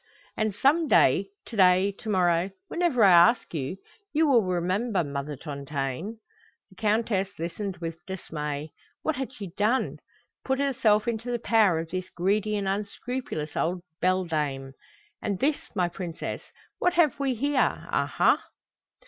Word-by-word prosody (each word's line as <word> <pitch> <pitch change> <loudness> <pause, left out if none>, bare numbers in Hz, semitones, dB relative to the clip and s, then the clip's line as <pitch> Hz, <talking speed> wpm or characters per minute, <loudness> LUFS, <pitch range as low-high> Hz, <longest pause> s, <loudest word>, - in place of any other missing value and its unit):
And 215 -2 -1
some 305 +8 +3
day, - - +4 0.2
to 235 - -9
day, 185 0 +5
to 220 - -6
morrow, 180 -2 +2 0.2
whenever 335 -10 +2
I 195 - +8
ask 175 +7 +5
you, 155 +3 -3 0.3
you 315 +1 +3
will 265 -6 +5
remember 185 +3 0
Mother 140 0 -4
Tontaine." 140 - -4 0.5
The - - -18
Countess 210 -2 0
listened 185 +3 -4
with 165 0 -6
dismay. 150 -5 -5 0.3
What 315 -3 0
had 265 -1 -3
she 200 -8 -8
done? 220 +6 +1 0.4
Put 265 0 0
herself 230 -6 +2
into 230 +1 -2
the 240 - 0
power 220 -6 +3
of 165 0 -4
this 185 0 -4
greedy 205 +4 0
and 200 -1 -2
unscrupulous 200 - -4
old 175 +1 -1 0.2
beldame? 155 -8 0 0.5
"And 205 -3 -1
this, 290 +8 +1 0.2
my 180 -3 +2
princess? 175 -1 -5 0.4
What 360 - +2
have 315 -6 +3
we 270 -2 0
here, 280 +2 0
aha?" - - +2
195 Hz, 145 wpm, -27 LUFS, 170-235 Hz, 0.5 s, I